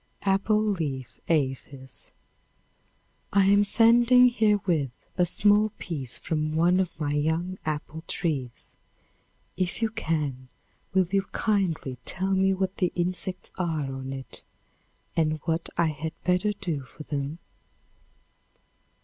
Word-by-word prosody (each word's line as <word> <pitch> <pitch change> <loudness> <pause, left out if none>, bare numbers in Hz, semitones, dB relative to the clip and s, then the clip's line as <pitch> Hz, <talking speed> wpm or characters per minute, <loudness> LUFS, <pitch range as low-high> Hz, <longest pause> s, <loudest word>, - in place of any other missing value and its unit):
Apple 200 +2 +2
Leaf 150 - -3
Aphis. 135 -3 -2 1.2
I 200 -1 +4
am 200 +1 +5
sending 240 +4 +6
herewith 205 - +2 0.3
a 180 -2 +2
small 210 +4 +4
piece 140 -8 -4
from 155 -1 -2
one 175 +3 +4
of 180 -3 -2
my 145 -2 -1
young 160 +5 0
apple 155 +1 -4
trees. 135 -8 -3 0.8
If 180 -1 -1
you 225 -2 0
can, 150 - -2 0.5
will 190 -1 +5
you 195 -1 +3
kindly 170 - 0
tell 190 +1 0
me 190 0 +3
what 190 0 -1
the 180 -2 +1
insects 180 +1 -3
are 155 -6 -1
an 135 0 -5
it, 135 -1 -4 0.7
and 155 -1 +1
what 165 0 -1
I 170 -2 +3
had 155 +1 -4
better 180 +3 +2
do 180 -8 -3
for 135 +3 -11
them? 145 +1 -3
170 Hz, 125 wpm, -27 LUFS, 150-195 Hz, 1.2 s, sending